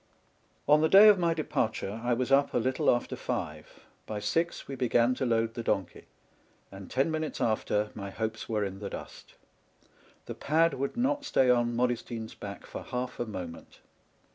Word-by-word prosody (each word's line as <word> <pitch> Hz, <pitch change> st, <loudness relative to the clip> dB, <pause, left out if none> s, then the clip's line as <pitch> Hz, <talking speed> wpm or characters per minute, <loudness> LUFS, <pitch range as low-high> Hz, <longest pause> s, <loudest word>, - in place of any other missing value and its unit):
On 150 Hz, +1 st, +6 dB
the 160 Hz, -, +3 dB
day 200 Hz, +2 st, +9 dB
of 205 Hz, -3 st, +5 dB
my 170 Hz, -2 st, +1 dB
departure 110 Hz, -8 st, -2 dB
I 120 Hz, 0 st, +1 dB
was 125 Hz, +2 st, -1 dB
up 140 Hz, +1 st, +3 dB
a -, -, +4 dB
little 130 Hz, +2 st, +1 dB
after 120 Hz, -, +1 dB
five; -, -, -5 dB, 0.2 s
by 105 Hz, -, -4 dB
six, 165 Hz, +12 st, -1 dB
we 140 Hz, -, -6 dB
began 125 Hz, -1 st, +2 dB
to 130 Hz, 0 st, -2 dB
load 115 Hz, -1 st, +1 dB
the 115 Hz, -, -4 dB
donkey; 100 Hz, -6 st, -2 dB, 0.7 s
and 95 Hz, -1 st, -10 dB
ten 135 Hz, +5 st, +1 dB
minutes 155 Hz, -1 st, -3 dB
after, 105 Hz, -1 st, 0 dB
my 100 Hz, -2 st, -6 dB
hopes 110 Hz, +3 st, -4 dB
were 105 Hz, -2 st, 0 dB
in 95 Hz, 0 st, -6 dB
the 100 Hz, -1 st, -5 dB
dust. -, -, -10 dB, 0.9 s
The -, -, -5 dB
pad 165 Hz, +3 st, +2 dB
would 140 Hz, -, -3 dB
not 285 Hz, +4 st, +1 dB
stay 130 Hz, -, +3 dB
on 120 Hz, -1 st, +1 dB
Modestine's 120 Hz, -2 st, -2 dB
back 100 Hz, -1 st, -8 dB
for -, -, -7 dB
half 125 Hz, 0 st, -5 dB
a 120 Hz, -, -2 dB
moment. 90 Hz, -6 st, -8 dB
120 Hz, 180 wpm, -29 LUFS, 110-140 Hz, 0.9 s, day